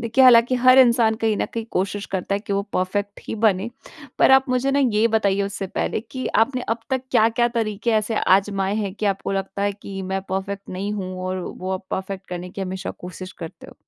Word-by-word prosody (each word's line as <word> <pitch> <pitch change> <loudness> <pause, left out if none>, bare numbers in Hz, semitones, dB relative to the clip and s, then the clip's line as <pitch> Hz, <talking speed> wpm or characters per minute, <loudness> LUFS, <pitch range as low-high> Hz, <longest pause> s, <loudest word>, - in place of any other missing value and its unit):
देखिए, 235 +3 +3
हालाँकि 245 0 +7
हर 255 +1 +8
इंसान 235 -3 +5
कहीं 220 -1 0
न - - -1
कहीं 230 - -2
कोशिश 200 +2 -2
करता 190 +1 -1
है - - 0
कि 205 - -5
वो 200 0 +1
परफ़ेक्ट 200 +2 -2
ही - - -2
बने, 210 -1 +1 0.5
पर - - +5
आप 265 0 +5
मुझे 255 +2 +1
ना, 280 - +2
ये 230 -4 +3
बताइए 200 -3 +2
उससे 200 -1 -3
पहले 200 - -2
कि 255 +3 -6 0.2
आपने 255 +1 -5
अब 225 +1 0
तक 260 -1 0
क्या-क्या 235 0 +3
तरीके 220 +1 -1
ऐसे 215 0 +1
आज़माए 195 +1 +2
हैं 200 -3 -2
कि 210 0 -2
आपको 195 0 -1
लगता 195 +1 -3
है 205 0 +1
कि, 195 -1 -8
"मैं 190 +1 -2
परफ़ेक्ट 195 +1 -4
नहीं 195 +3 -3
हूँ।" 185 -3 -4
और 185 0 -2
वो 185 +1 -6
आप 185 0 -4
परफ़ेक्ट 190 0 -4
करने 180 0 -6
की 195 - -8
हमेशा 190 0 -4
कोशिश 185 +1 -9
करते 165 - -8
हो? - - -14
205 Hz, 220 wpm, -22 LUFS, 190-230 Hz, 0.5 s, हर